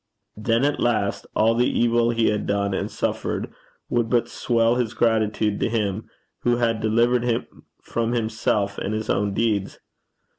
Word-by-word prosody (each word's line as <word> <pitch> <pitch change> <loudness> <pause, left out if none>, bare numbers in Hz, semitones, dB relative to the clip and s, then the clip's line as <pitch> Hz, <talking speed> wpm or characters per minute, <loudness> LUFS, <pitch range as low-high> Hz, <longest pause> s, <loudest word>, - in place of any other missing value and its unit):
Then 115 +4 +1
at 145 - 0
last, 110 -4 0
all 110 +1 +4
the 120 +2 +2
evil 120 0 +2
he 115 -1 +2
had 105 -1 -2
done 100 0 0
and - - -2
suffered - - -3 0.3
would 120 -1 0
but 120 -1 +2
swell 115 -1 +1
his 120 -2 -1
gratitude 110 -2 +1
to - - 0
Him 105 -2 -2 0.3
who 120 0 +2
had 115 -2 0
delivered 120 +3 +2
him 120 -1 0 0.4
from 115 0 -1
himself 110 -3 -1
and 105 - -2
his 110 0 -2
own 100 -1 0
deeds. 105 -4 0
115 Hz, 160 wpm, -23 LUFS, 105-120 Hz, 0.4 s, all